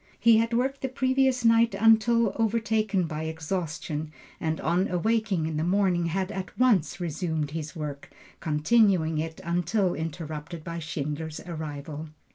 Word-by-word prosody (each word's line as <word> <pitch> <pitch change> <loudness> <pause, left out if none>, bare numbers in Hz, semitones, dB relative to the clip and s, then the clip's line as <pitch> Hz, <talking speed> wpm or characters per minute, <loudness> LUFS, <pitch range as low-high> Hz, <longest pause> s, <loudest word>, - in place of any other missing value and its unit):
He 230 -1 +6
had 230 +1 +1
worked 265 +4 0
the 265 - -2
previous 260 -1 +1
night 230 0 +5
until 225 0 +4
overtaken 220 -3 +1
by 155 -1 -4
exhaustion 160 -1 -4 0.3
and 160 0 -1
on 175 +5 +1
awaking 195 -1 0
in 160 -1 -2
the 155 - 0
morning 180 -1 +2
had 190 +3 -1
at 190 -2 -6
once 195 -9 +3
resumed 160 -3 -2
his 155 -2 -5
work, 150 -3 -6 0.3
continuing 160 0 +2
it 160 +1 -4
until 175 +3 +1
interrupted 160 0 -5
by 170 0 -5
Schindler's 155 0 -4
arrival. 155 -2 -6
175 Hz, 140 wpm, -27 LUFS, 160-220 Hz, 0.3 s, He